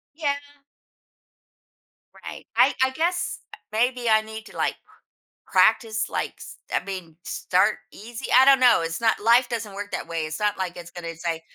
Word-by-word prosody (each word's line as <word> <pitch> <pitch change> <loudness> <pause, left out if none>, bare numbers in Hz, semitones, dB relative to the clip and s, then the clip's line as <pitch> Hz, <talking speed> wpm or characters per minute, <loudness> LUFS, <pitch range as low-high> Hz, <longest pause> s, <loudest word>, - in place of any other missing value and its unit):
Yeah. 290 -3 0 1.9
Right, - - -8
I - - +5
I 260 - +3
guess 345 +5 -1 0.3
maybe 240 +2 0
I 220 0 +5
need 220 0 -9
to, - - -13
like, - - 0 0.7
practice, 220 +3 +2
like, - - -3
s - - -11 0.2
I - - +1
mean, 185 -5 -7
start 190 +4 +1 0.2
easy? 235 +4 -9
I 260 - +8
don't 275 -1 +7
know, 245 -6 +5
it's 165 +3 -4
not 225 -1 +2
Life 240 +2 +5
doesn't 225 -4 -4
work 205 +1 -7
that - - -4
way, 165 -2 -3
it's 155 0 -5
not 210 -1 0
like 185 -2 -3
it's 170 -1 -10
gonna 170 -1 -7
say, 165 0 -3
215 Hz, 170 wpm, -24 LUFS, 180-240 Hz, 1.9 s, I